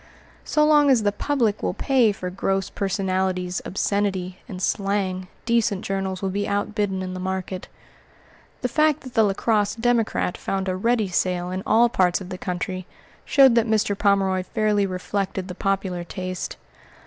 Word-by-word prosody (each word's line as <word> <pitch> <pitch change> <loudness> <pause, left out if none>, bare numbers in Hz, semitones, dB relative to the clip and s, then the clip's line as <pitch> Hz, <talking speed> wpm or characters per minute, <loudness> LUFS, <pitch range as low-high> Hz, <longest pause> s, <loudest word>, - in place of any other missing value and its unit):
So 300 0 +2
long 295 -1 +5
as 245 -5 +4
the 205 - +2
public 225 -2 0
will - - -1
pay 255 -6 +3
for 180 -2 -5
gross 195 +1 -1
personalities, 185 -2 -1
obscenity, 190 -2 -1
and 185 - -6
slang, 190 -1 -1 0.2
decent 230 -4 +1
journals 190 -1 -2
will 190 - 0
be 205 +1 -1
outbidden 205 -2 -1
in 185 0 -5
the 185 - -5
market. 185 0 -4 0.9
The 250 - +1
fact 305 +3 +2
that 255 -2 -10
the 225 - +4
La 205 -2 +3
Crosse 210 0 +1
Democrat 230 -5 0
found 195 0 -2
a 185 - 0
ready 220 +1 +1
sale 180 0 0
in 185 +1 -3
all 235 +2 +5
parts 185 -6 +2
of 185 -2 -9
the 185 -1 -6
country 185 0 -4 0.4
showed 270 -3 +6
that 230 0 +3
Mr. 215 -2 +2
Pomeroy 195 -2 +2
fairly 210 0 +1
reflected 185 +1 -3
the 180 - -6
popular 190 -2 -1
taste. 185 +1 -5
195 Hz, 165 wpm, -23 LUFS, 185-215 Hz, 0.9 s, showed